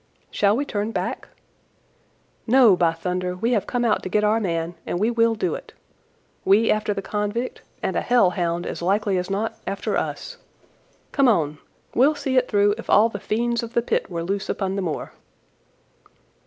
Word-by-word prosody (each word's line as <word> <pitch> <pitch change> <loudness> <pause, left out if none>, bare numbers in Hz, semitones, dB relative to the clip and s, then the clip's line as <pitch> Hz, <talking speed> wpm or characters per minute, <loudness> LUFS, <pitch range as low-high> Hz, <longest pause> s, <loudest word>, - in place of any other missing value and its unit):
"Shall 205 +2 +2
we 285 - -1
turn 210 -4 -2
back?" - - -3 1.2
"No, 240 -4 +6
by 170 -2 +3
thunder; 180 +2 -3
we 225 +6 -1
have 215 -5 +1
come 245 -1 0
out 220 - +2
to - - -5
get 210 +2 +1
our 215 +2 +3
man, 170 -4 -2
and 175 - -3
we 220 +4 +2
will 230 -1 +2
do 180 -6 -1
it. - - -8 0.7
We 205 +4 +4
after 215 0 0
the 195 -1 -3
convict, 210 +5 -3 0.2
and - - -1
a - - +1
hell 240 -7 +3
hound, 175 -1 -1
as - - -5
likely 195 +1 +1
as 180 +1 -4
not, 205 +3 -2
after 195 - -2
us. - - -3 0.7
Come 275 -2 +3
on! 155 -9 +1 0.3
We'll 280 +5 +4
see 270 -2 -2
it 255 -1 +3
through 205 -1 +3
if - - -9
all 220 +3 +5
the 205 - -6
fiends 235 +4 -1
of 235 0 -7
the 235 - +1
pit - - -1
were 170 -2 -3
loose 195 +3 -3
upon 195 -1 -1
the 200 - -1
moor." 165 -5 -4
205 Hz, 190 wpm, -23 LUFS, 185-230 Hz, 1.2 s, No